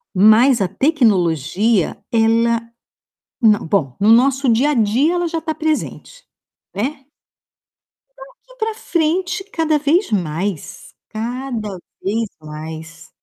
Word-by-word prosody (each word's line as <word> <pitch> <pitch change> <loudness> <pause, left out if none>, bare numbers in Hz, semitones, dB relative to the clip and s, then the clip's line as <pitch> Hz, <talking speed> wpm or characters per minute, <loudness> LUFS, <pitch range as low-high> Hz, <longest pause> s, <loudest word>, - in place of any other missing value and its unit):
Mas 220 +5 +5
a 190 - +2
tecnologia, 200 - +1
ela 230 0 +2 0.8
não, 215 -6 +3
bom, 150 -9 0
no 210 +2 +4
nosso 265 +3 +3
dia 240 +6 +3
a - - +1
dia, 245 +7 +2
ela 350 -1 0
já 330 -1 -3
tá 315 0 -3
presente, 315 +11 -4 0.5
né. 270 +6 -4 1.1
Daqui - - -16
pra 445 0 -1
frente, 360 -2 -1
cada 320 -6 0
vez 310 - +1
mais, 180 -2 -3 0.2
cada 230 -2 -5 0.2
vez 220 +3 -1
mais. 160 +2 -9
230 Hz, 115 wpm, -18 LUFS, 200-310 Hz, 1.1 s, Mas